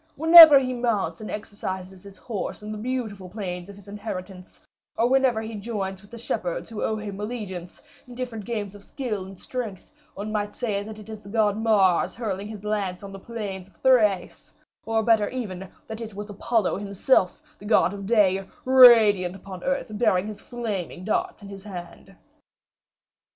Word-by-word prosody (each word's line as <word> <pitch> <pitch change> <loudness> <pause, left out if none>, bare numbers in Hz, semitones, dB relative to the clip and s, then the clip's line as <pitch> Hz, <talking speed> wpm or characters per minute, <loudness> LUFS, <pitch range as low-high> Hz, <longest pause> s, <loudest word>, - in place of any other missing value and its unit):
Whenever 320 -1 +10
he 255 -1 0
mounts 220 -9 -1
and 215 - -7
exercises 190 -3 -6
his 200 0 -14
horse 210 -2 -5
in 210 - -6
the 215 - -5
beautiful 220 -6 -4
plains 180 -2 -6
of 200 - -10
his 200 0 -16
inheritance, 190 -3 -8 0.4
or 230 - +3
whenever 255 -3 +2
he 225 +1 -7
joins 200 -3 -4
with 205 - -18
the 235 - -10
shepherds 180 -5 -4
who 220 - -5
owe 220 - 0
him 205 -2 -6
allegiance, 205 -6 -6 0.2
in 245 - -11
different 240 -4 -5
games 210 -3 -4
of 205 -1 -13
skill 215 -8 -4
and 190 -1 -12
strength, 225 -7 -6 0.2
one 210 +2 -5
might 210 -1 -2
say 210 -5 -2
that 215 +1 -8
it 215 -1 -12
is 215 -1 -8
the 200 - -13
god 210 -2 +2
Mars 210 -5 +2
hurling 205 -4 -4
his 210 -2 -9
lance 205 -3 -2
on 200 - -8
the 195 - -9
plains 195 -4 -6
of 195 - -25
Thrace, 215 -8 +2 0.4
or, 225 0 +1 0.3
even 215 -8 -5
better, 190 0 -10
that 220 +1 -7
it 220 -3 -7
was 205 +1 -7
Apollo 215 -1 0
himself, 200 0 +1 0.2
the 205 - -12
god 200 -4 +3
of 200 -1 -7
day, 195 -4 +3 0.2
radiant 225 -8 +7
upon 190 -2 -10
earth, 275 -4 -2
bearing 195 -5 +2
his 215 -1 -8
flaming 210 -8 -5
darts 215 0 -2
in - - -9
his 195 -1 -10
hand." 180 -4 -10
210 Hz, 180 wpm, -25 LUFS, 195-225 Hz, 0.4 s, Whenever